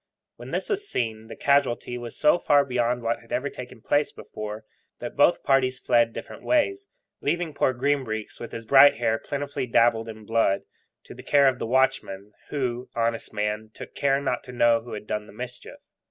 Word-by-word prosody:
When - - -10
this - - -2
was 410 -1 -2
seen, 110 -2 -2
the - - -9
casualty 140 -4 +1
was 120 -1 -7
so 150 +3 +4
far 145 -3 +4
beyond 120 -2 0
what 115 +1 0
had 115 - -20
ever 140 +3 -1
taken 125 -2 -10
place 145 +5 +1
before, 105 0 -8 0.3
that - - -7
both - - +4
parties 130 -1 +2
fled 120 -2 +2
different - - -8
ways, 390 +6 +1 0.3
leaving 175 -3 -1
poor 135 - +2
Green 140 +2 0
Breeks, 110 -2 -5
with 120 - -7
his 115 0 -7
bright 140 +4 +7
hair 115 -1 0
plentifully 145 -2 -4
dabbled 115 -1 +3
in 110 -1 -10
blood, 115 -3 +1 0.4
to - - -11
the - - -11
care 140 -1 +4
of 130 - +1
the - - -3
watchman, 120 -6 0 0.2
who 125 -3 -3
(honest 115 0 -1
man) 105 +1 -2
took - - -10
care 140 -1 +1
not 140 - -2
to 125 - -9
know 120 -2 +3
who 120 - -10
had 105 - -6
done 105 0 -3
the - - -14
mischief. 125 +3 -8
120 Hz, 195 wpm, -25 LUFS, 115-140 Hz, 0.4 s, bright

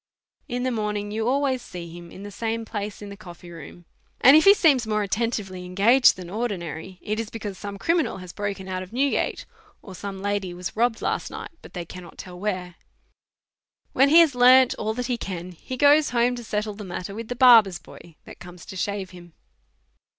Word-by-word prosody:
In 245 +1 -3
the 255 - 0
morning 210 -2 -3
you 220 +1 -2
always 265 -1 +1
see 170 -6 -9
him 175 0 -11
in 195 - -11
the 205 - -8
same 225 +2 -3
place 210 -1 -6
in 205 - -8
the 200 - -8
coffee 175 -3 -12
room, 170 +1 -12 0.3
and 270 +3 +8
if 315 - +6
he 400 +1 +8
seems 275 - +3
more 215 -1 0
attentively 205 -3 -2
engaged 205 +8 +4
than 180 -2 -9
ordinary, 185 -4 -5
it 215 +1 -2
is 225 -2 -4
because 210 -3 -6
some 200 +1 -7
criminal 330 - 0
has 185 -1 -10
broken 200 -2 -4
out 185 -1 -3
of 185 - -10
Newgate, 270 +4 -1 0.4
or 195 - -10
some 195 +1 -7
lady 200 -2 -2
Vvas 180 +1 -5
robbed 230 0 0
last - - -2
night, - - -8
but - - -14
they 175 -1 -4
cannot 175 0 -11
tell 180 -1 -10
where. 185 -3 -4 1.2
When 275 +2 +4
he 310 - +3
lias 330 -4 +6
learned 255 +1 +6
all 220 0 -2
that 250 0 -3
he 240 -1 -2
can, 180 -2 -6
he 255 +9 -8
goes 290 +3 +5
home 245 0 +2
to 240 - -7
settle 210 -1 -3
the 210 +1 -9
matter 180 +1 -6
with 225 +2 -7
the 245 - -4
barber's 230 -8 +6
boy 170 -2 -15
that - - -12
comes 175 0 -12
to 195 - -9
shave 195 +1 -3
him. 175 -2 -14
205 Hz, 210 wpm, -24 LUFS, 185-240 Hz, 1.2 s, and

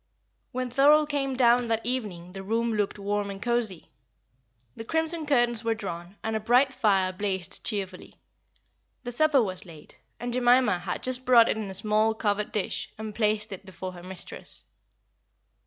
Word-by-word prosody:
When 255 -1 -3
Thorold 295 +4 +5
came 275 -2 -1
down 245 -1 +4
that 225 -1 -1
evening 205 -9 -3
the 195 +1 -7
room 225 +3 0
looked 210 -1 -1
warm 205 0 -2
and 195 0 -6
cosy. 235 -6 -2 0.8
The - - -7
crimson 320 +4 -1
curtains 240 -4 +2
were 225 0 +1
drawn, 180 -3 -7
and 220 0 -2
a - - +1
bright 250 +5 +3
fire 195 -6 +2
blazed 190 -3 -2
cheerfully. 195 -4 -4 0.9
The 245 - -4
supper 285 0 +4
was 185 -3 -4
laid, 160 -5 -14 0.2
and 240 +1 -4
Jemima 245 -5 +4
had 175 0 -4
just 255 0 -1
brought 240 -3 +6
in 215 -2 -2
a 190 - -4
small, 215 +2 +2
covered 210 -1 -1
dish, 210 -3 -2
and 220 0 -6
placed 215 0 0
it 195 0 -7
before 190 -1 -7
her 175 -1 -11
mistress. 185 0 -6
220 Hz, 165 wpm, -27 LUFS, 195-245 Hz, 0.9 s, brought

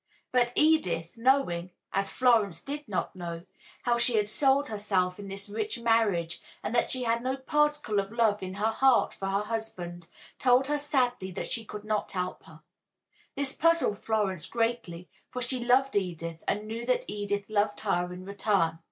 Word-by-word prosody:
But 245 -1 +3
Edith, 300 - +2
knowing 230 -8 +2 0.2
(as 195 0 0
Florence 225 -9 +3
did 290 +1 -6
not 195 -1 -2
know) 170 -2 -6 0.4
how 240 0 +2
she 240 0 +3
had 210 -1 +2
sold 275 +5 +2
herself 195 -4 0
in 200 - -7
this 195 +1 -6
rich 215 +3 -3
marriage 220 -8 +1 0.2
and 220 - -3
that 240 - +2
she 255 -1 +2
had 230 0 +1
no 260 +2 -1
particle 295 -5 +1
of 195 +1 -3
love 225 -3 +2
in 185 0 -5
her 215 +3 +1
heart 265 +2 +4
for 195 - -5
her 195 +1 0
husband, 185 -6 -5 0.3
told 255 0 +4
her 295 +1 0
sadly 250 -9 0
that - - -5
she 230 - -1
could 210 -1 -8
not 215 -1 -1
help 180 -1 -3
her. - - -15 0.7
This 275 -1 -2
puzzled 330 -10 +2
Florence 200 -7 0
greatly, 225 -7 -2 0.2
for 250 - -5
she 245 0 0
loved 255 +2 +3
Edith 170 -4 -2
and 210 +1 0
knew 230 +2 -4
that 255 - +1
Edith 205 -1 -2
loved 210 -1 0
her 180 -4 0
in 180 +1 -8
return. 195 -5 +1
215 Hz, 180 wpm, -29 LUFS, 190-250 Hz, 0.7 s, heart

